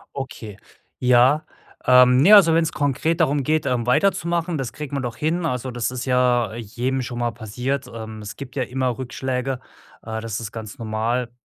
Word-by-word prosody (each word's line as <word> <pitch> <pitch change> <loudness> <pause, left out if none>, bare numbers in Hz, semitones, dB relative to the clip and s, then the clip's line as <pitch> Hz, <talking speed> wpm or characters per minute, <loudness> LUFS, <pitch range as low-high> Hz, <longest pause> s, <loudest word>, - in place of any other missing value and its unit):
Okay, 115 -6 -7 0.4
ja. 125 +5 +4 0.4
Ähm, 125 0 +6
ne, 165 +11 +6
also 185 -6 +8
wenn's 165 0 +2
konkret 155 +4 0
darum 145 -3 +2
geht, 155 +2 +1
ähm, 125 -3 -1
weiterzumachen, 170 +2 +1
das 130 -4 -3
kriegen 150 -2 -6
wir 140 - -1
doch 120 -3 -4
hin. 165 +5 -1
Also, 125 -3 -2
das 120 -1 -2
ist 125 0 -5
ja 125 -4 +2
jedem 120 +4 -3
schon 120 -1 -5
mal 120 -1 0
passiert. 125 +5 -4
Ähm, 110 -1 -8
es 105 -1 -8
gibt 135 -3 -9
ja 135 - 0
immer 125 -1 -2
Rückschläge, 130 0 -3 0.4
äh, 110 0 -5
das 115 -1 -4
ist 110 -2 -6
ganz 110 -2 -8
normal. 115 +2 -2
125 Hz, 185 wpm, -22 LUFS, 120-140 Hz, 0.4 s, also